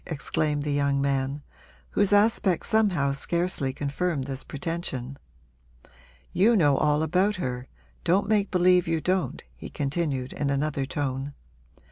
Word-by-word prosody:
exclaimed 150 -1 -1
the 150 - -2
young 140 -1 +1
man, 140 +1 -1 0.5
whose 205 - +2
aspect 205 -3 +3
somehow 190 -11 +2
scarcely 170 -1 0
confirmed 145 +2 -2
this 135 0 -5
pretension. 145 -4 -4 1.2
'You 220 +6 +4
know 145 -8 +4
all 150 0 +2
about 185 +6 +2
her 125 -8 -4 0.4
don't 185 +4 +2
make 205 -2 +2
believe 180 -1 +3
you 165 -1 +1
don't,' 185 +3 -1
he - - -9
continued 140 -3 -2
in 145 - -2
another 140 -1 -1
tone. 140 -1 -3
150 Hz, 130 wpm, -26 LUFS, 140-180 Hz, 1.2 s, You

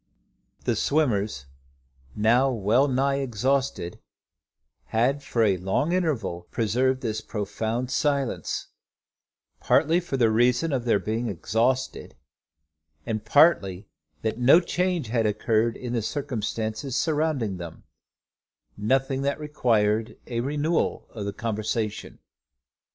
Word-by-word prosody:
The - - +1
swimmers, 105 - 0 0.7
now 120 +5 +3
wellnigh 130 +5 +2
exhausted, 130 -6 -1 0.9
had 130 +6 +1
for 120 -4 0
a 100 -4 +3
long 95 - 0
interval 120 - -1
preserved 130 +4 +1
this 110 -3 -2
profound 110 +4 -3
silence, 140 -2 -1 0.9
partly 165 +3 +3
for 170 -6 -3
the 115 -3 +3
reason 125 +7 +2
of 125 -3 -1
their 115 -3 +3
being 110 +3 -2
exhausted, 115 +8 -1 0.9
and 110 -1 -3
partly 105 - +3 0.4
that 110 +1 -2
no 130 +7 +7
change 180 -6 -1
had 115 -2 +1
occurred 110 +2 +1
in 125 -1 -5
the 115 - 0
circumstances 115 0 -3
surrounding 150 - 0
them, 85 -2 -9 0.9
nothing 135 +5 0
that 140 +1 -1
required 115 -7 +1
a 120 -2 -3
renewal 150 +6 0
of 105 -3 -6
the 100 - -2
conversation. 110 -1 -3
120 Hz, 110 wpm, -25 LUFS, 110-140 Hz, 0.9 s, no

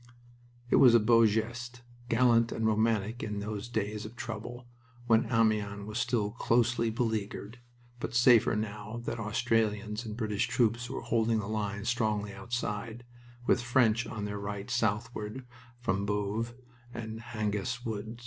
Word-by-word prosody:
It - - +6
was 125 -3 +8
a - - +8
beau 115 +1 +5
geste, 120 +3 -3 0.3
gallant 115 -1 +4
and 110 - -2
romantic 110 +1 +1
in 105 -1 -3
those 105 +2 -4
days 105 -2 -2
of 110 +2 -9
trouble, 120 +2 -6 0.4
when 115 0 +3
Amiens 105 -3 +1
was 105 +2 -4
still 115 -3 0
closely 120 0 +2
beleaguered, 110 -1 -3 0.4
but 120 - -4
safer 120 -2 +6
now 105 +1 -4
that 115 - -3
Australians 110 -1 0
and 110 -2 -6
British 105 -3 0
troops 120 0 +1
were - - -4
holding 115 -1 +1
the 105 - -2
lines 105 -1 -3
strongly 110 -4 0
outside, 115 +2 -4 0.4
with 120 - +3
French 120 -2 +2
on 105 -2 -4
their 105 0 -4
right 100 +3 -5
southward 115 +1 -1 0.3
from 100 -4 -1
Boves 105 +3 -1 0.4
and 110 -2 -6
Hangest 115 +2 -3
Wood. 110 +1 -4
110 Hz, 145 wpm, -30 LUFS, 105-120 Hz, 0.4 s, was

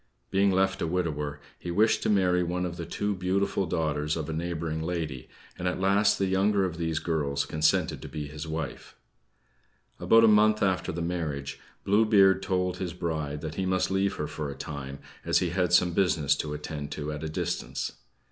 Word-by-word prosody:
Being 100 +1 +3
left 95 0 +1
a - - 0
widower, 75 -4 -2 0.2
he 90 - -6
wished 105 +6 +3
to - - 0
marry 90 -3 +3
one 90 +1 -1
of 85 -1 -5
the 85 - -5
two 105 +4 -1
beautiful 95 +1 0
daughters 75 -1 -1
of 80 - -3
a - - -3
neighboring 80 -1 -3
lady, 80 -6 -4 0.3
and 90 - -1
at 90 - -1
last 100 +2 +3
the 100 - +1
younger 95 +1 +2
of 85 -3 -4
these 80 -1 -1
girls 75 -4 -1
consented 80 0 +1
to - - -8
be 75 -2 -5
his 75 +2 -7
wife. 80 -2 -5 1.0
About 115 0 +5
a - - +7
month 105 0 +5
after 95 -1 +1
the 85 0 -3
marriage, 75 -5 -3 0.2
Blue 105 +3 +4
Beard 95 -3 +5
told 90 -1 -1
his 90 -3 -4
bride 80 -4 -3
that 80 -1 -5
he 95 - -1
must 95 0 +1
leave 95 +1 +1
her 75 - -3
for 75 -1 -5
a 70 - -6
time, 70 -1 -6 0.3
as - - +2
he 90 -2 +1
had 90 -1 0
some 90 0 +4
business 80 -6 +2
to 75 -1 -3
attend 75 -1 -6
to 75 0 -4
at 75 +1 -5
a 80 - -3
distance. 85 +2 -3
85 Hz, 200 wpm, -28 LUFS, 75-95 Hz, 1.0 s, a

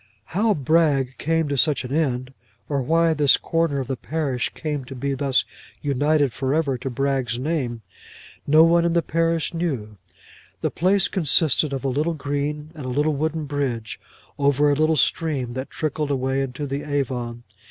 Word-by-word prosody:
How 210 +4 +2
Bragg 140 -3 +2
came 165 0 +1
to 140 - 0
such 150 +1 +2
an 125 - -5
end, 130 -4 -1 0.3
or 140 -2 0
why 165 +4 +3
this 145 -3 +5
corner 165 -4 0
of - - -4
the 130 - -3
parish 140 -3 -2
came 150 -3 -3
to 135 - -9
be 140 +2 -2
thus 135 -1 +1 0.4
united 145 -1 +2
for 135 +1 -1
ever 150 -4 +1
to 135 - -4
Bragg's 130 -2 -1
name, 125 -5 -2 0.6
no 155 +2 +7
one 170 +1 +4
in 170 0 +1
the 170 -1 +2
parish 165 +2 0
knew. 130 -12 -3 0.6
The - - 0
place 190 +3 +2
consisted 155 -3 +2
of 135 0 -4
a - - +2
little 150 +6 0
green, 145 +1 -3
and 150 -5 -8
a - - -3
little 145 +4 +1
wooden 155 +2 -2
bridge, 135 -6 -3 0.4
over 145 +1 +3
a - - +2
little 155 +1 +2
stream 135 -2 0
that 130 +2 -5
trickled 155 -1 -2
away 135 0 0
into 135 +2 -4
the 140 +1 -3
Avon. 125 -5 -3
145 Hz, 175 wpm, -23 LUFS, 130-160 Hz, 0.6 s, no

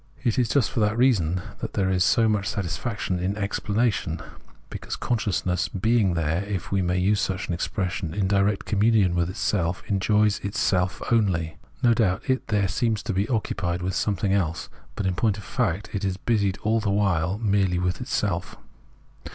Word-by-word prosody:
It 120 -1 +1
is 120 -3 +1
just 120 -1 +2
for 125 - -2
that 105 +1 +1
reason 90 -9 +2 0.2
that - - -5
there 95 -1 +1
is 90 -1 +3
so 115 +3 +4
much 105 -2 0
satisfaction 100 0 -2
in 95 +3 -2
explanation, 105 -3 -1 0.5
because - - -5
consciousness 90 -6 -1
being 105 -2 +1
there, 85 +3 0
if 100 -3 -4
we 100 -1 +2
may 90 0 0
use 100 +3 +2
such 95 -2 -2
an 90 - -2
expression, 90 -1 -2
in 100 +1 0
direct 100 +1 +1
conununion 105 -3 +3
with 85 0 0
itself, 95 -3 -1
enjoys 105 +1 +2
itself 95 -2 0
only. 90 -8 +1 0.3
No 120 -1 +6
doubt 100 -5 0
it 130 0 0
there 105 -3 +1
seems 110 +1 0
to 110 - -2
be 100 +3 0
occupied 90 -7 -1
with 95 +1 -1
something 100 -1 0
else, 85 -5 -1 0.3
but 100 - -3
in 95 - +1
point 105 +3 +1
of 100 - -8
fact 105 -5 -2
it 100 -1 -2
is 95 -1 -1
busied 100 -4 0
all 110 +1 +2
the 105 - -1
while 95 -3 +1
merely 100 -4 +1
with 90 +3 -1
itself. 100 -7 -2
100 Hz, 180 wpm, -25 LUFS, 90-110 Hz, 0.5 s, No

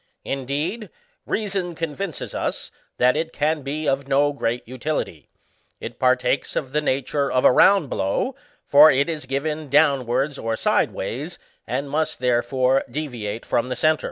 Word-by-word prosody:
Indeed, 145 - -3 0.4
reason 195 -5 -2
convinces 165 +1 -4
us, - - -3 0.3
that 125 +2 +4
it 160 +1 -2
can 155 0 0
be 145 +3 -4
of 135 0 0
no 145 +1 +2
great 120 -4 -2
utility; 130 - -4 0.5
it - - -8
partakes 125 +1 +1
of 130 -3 -2
the 150 +2 +1
nature 140 0 -1
of 125 - +2
a - - +8
round 195 +4 +5
blow, 100 - -1 0.3
for 150 +2 +8
it 140 +2 +2
is 155 -5 -4
given 150 +2 -3
downwards 140 -1 +2
or 115 0 -2
sideways, - - -1 0.3
and 130 +5 -2
must, 155 +3 -1
therefore, 130 +1 +1
deviate 120 -6 -5
from 120 +2 0
the 125 - -2
centre. 155 +5 +2
140 Hz, 150 wpm, -22 LUFS, 125-155 Hz, 0.5 s, a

